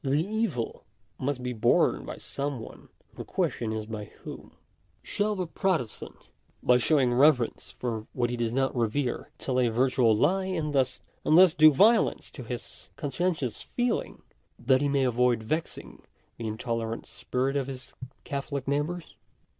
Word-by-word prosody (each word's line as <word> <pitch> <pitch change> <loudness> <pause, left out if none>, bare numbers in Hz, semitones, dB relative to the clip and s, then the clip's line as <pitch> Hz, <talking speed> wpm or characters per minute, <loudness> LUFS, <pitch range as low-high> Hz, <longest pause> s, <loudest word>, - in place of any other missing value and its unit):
The 135 0 +1
evil 215 - -2 0.4
must 130 -1 -2
be 125 0 -2
borne 120 +1 +2
by - - -6
some 140 -2 -4
one, 110 - -11 0.2
and - - -18
the - - -3
question 110 -2 -1
is 110 -1 -3
by 105 -1 -6
whom. - - -11 0.5
Shall 210 +1 -1
the 185 -2 -2
Protestant, 165 - -3 0.3
by 125 0 +5
showing 130 -2 +3
reverence 130 -2 +3
for 115 -3 -3
what 120 -1 0
he - - -1
does 120 -1 -1
not 135 +2 0
revere, 120 +2 -1
tell 130 -1 -1
a 125 - +3
virtual 120 -1 +3
lie, 185 - +2
and 165 -6 -2
thus 130 -2 +1 0.5
do 155 0 +7
violence 215 - +3
to 130 - -8
his 120 0 -7
conscientious 145 - -2
feeling 245 -2 -2 0.3
that 130 +2 +3
he 145 - +1
may 140 -1 +2
avoid 125 -2 +2
vexing 155 +9 -4 0.4
the 115 - -4
in 110 0 -4
tolerant 115 -1 -3
spirit 130 +2 -2
of 135 -2 0
his 130 -2 -8 0.3
Catholic 140 -1 -4
neighbours 150 +5 -2
130 Hz, 155 wpm, -28 LUFS, 120-150 Hz, 0.5 s, do